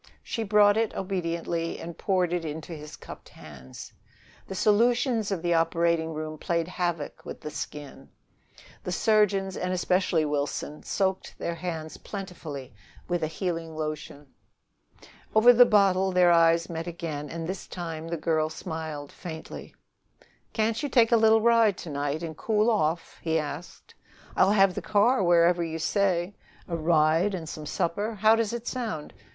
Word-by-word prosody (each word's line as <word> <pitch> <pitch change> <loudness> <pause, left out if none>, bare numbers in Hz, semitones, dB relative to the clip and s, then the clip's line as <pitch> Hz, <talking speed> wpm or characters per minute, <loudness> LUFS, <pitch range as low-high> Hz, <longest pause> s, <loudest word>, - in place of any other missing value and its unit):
She 230 - -4
brought 205 -1 +4
it 225 -1 0
obediently 170 -3 -3
and 170 0 -7
poured 180 -3 0
it 175 -1 -1
into 160 +2 -6
his 150 -1 -9
cupped - - -12
hands. 65 -4 -12 0.5
The 190 - -6
solutions 230 +2 +2
of 190 -4 -3
the 175 0 +2
operating 165 -1 +1
room 155 0 -5
played 170 0 -1
havoc 175 -4 -3
with - - -8
the 150 - -6
skin: 150 -2 -8 0.7
the 180 - -4
surgeons, 195 -1 +2
and 180 0 -2
especially 180 -3 +1
Wilson, 145 0 -3
soaked 190 -1 -2
their 170 - -3
hands 165 -2 -5
plentifully 160 - -7 0.3
with 175 -1 -1
a 155 - 0
healing 165 -1 -4
lotion. 155 -2 -5 1.1
Over 235 +3 +8
the 245 +1 +7
bottle 195 -2 +3
their 180 -1 +5
eyes 165 0 +4
met 165 0 -5
again, 155 -4 -5
and 165 +1 -5
this 185 +2 -5
time 165 -2 -6
the 170 0 -3
girl 155 -1 0
smiled 160 -3 -6
faintly. 160 -3 -9 0.8
"Can't 220 +2 0
you 290 - -2
take 235 -3 +4
a - - +6
little 220 0 +5
ride 230 -3 +4
to 165 - -7
night 145 +3 -2
and 160 -2 -5
cool 215 +5 +1
off? 165 -6 -1 1.1
I'll 190 - +4
have 195 -2 +4
the - - -4
car 215 +3 +3
wherever 175 0 +4
you 165 -1 -4
say. 185 +1 0 0.3
A 170 - -3
ride 165 +4 +2
and 165 -3 -6
some 155 -1 -7
supper 205 +9 -2
how 215 +2 +5
does 225 -2 0
it 235 0 -5
sound? 220 - -4
175 Hz, 155 wpm, -27 LUFS, 160-200 Hz, 1.1 s, Over